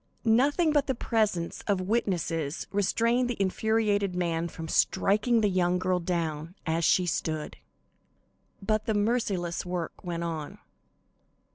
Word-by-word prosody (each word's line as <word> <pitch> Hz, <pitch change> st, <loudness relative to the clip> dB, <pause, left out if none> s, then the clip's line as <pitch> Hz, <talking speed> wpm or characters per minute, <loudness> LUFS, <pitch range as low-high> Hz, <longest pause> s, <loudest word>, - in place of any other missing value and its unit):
Nothing 285 Hz, +9 st, +3 dB
but 290 Hz, -2 st, +2 dB
the 265 Hz, -, 0 dB
presence 210 Hz, -8 st, -1 dB
of 200 Hz, -3 st, +2 dB
witnesses 175 Hz, -7 st, -1 dB
restrained 230 Hz, +5 st, +1 dB
the 240 Hz, -, -3 dB
infuriated 205 Hz, -1 st, +1 dB
man 170 Hz, -2 st, -1 dB
from 160 Hz, -1 st, -7 dB
striking 215 Hz, +8 st, +2 dB
the 210 Hz, -, +3 dB
young 180 Hz, -2 st, +2 dB
girl 185 Hz, 0 st, 0 dB
down, 165 Hz, -1 st, -3 dB
as 165 Hz, +1 st, 0 dB
she 180 Hz, +3 st, +4 dB
stood. 160 Hz, -2 st, -2 dB, 1.1 s
But 215 Hz, +1 st, 0 dB
the 220 Hz, -, +1 dB
merciless 205 Hz, -6 st, 0 dB
work 175 Hz, -2 st, -5 dB
went 170 Hz, -2 st, -3 dB
on. 160 Hz, -3 st, -4 dB
185 Hz, 130 wpm, -28 LUFS, 170-220 Hz, 1.1 s, she